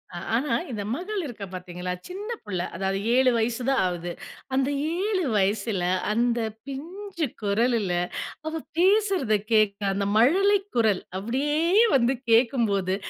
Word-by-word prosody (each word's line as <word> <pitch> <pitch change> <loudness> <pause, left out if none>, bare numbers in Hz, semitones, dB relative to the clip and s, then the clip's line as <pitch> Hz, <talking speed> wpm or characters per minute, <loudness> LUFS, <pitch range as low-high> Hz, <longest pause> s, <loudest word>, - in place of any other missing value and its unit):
அ - - -4 0.2
ஆனா, 280 +5 0 0.2
இந்த 210 -3 -3
மகள் 385 +4 -3
இருக்கா 220 -7 -6
பார்த்தீங்களா, 180 0 -5 0.2
சின்ன 400 +5 -7
புள்ள 185 -4 -3
அதாவது 195 +2 -1 0.2
7 260 -1 +5
வயசு 230 +2 0
தான் 270 - +3
ஆவுது. 175 0 -4 0.4
அந்த 265 +1 +2 0.3
7 400 -4 0
வயசுல, 200 0 +1 0.3
அந்த 240 +1 +1 0.3
பிஞ்சு 340 +6 -5 0.2
குரலுல 210 -2 +1 0.5
அவ 315 - -3 0.2
பேசுறத 380 - +3 0.2
கேட்க 215 -2 +3
அந்த 200 +1 -1
மழலை 390 - +5 0.2
குரல். 220 -5 +3 0.2
அப்படியே 260 +9 -1 0.4
வந்து 250 +1 +3 0.2
கேட்கும்போது 225 -6 +3
235 Hz, 130 wpm, -25 LUFS, 200-300 Hz, 0.5 s, 7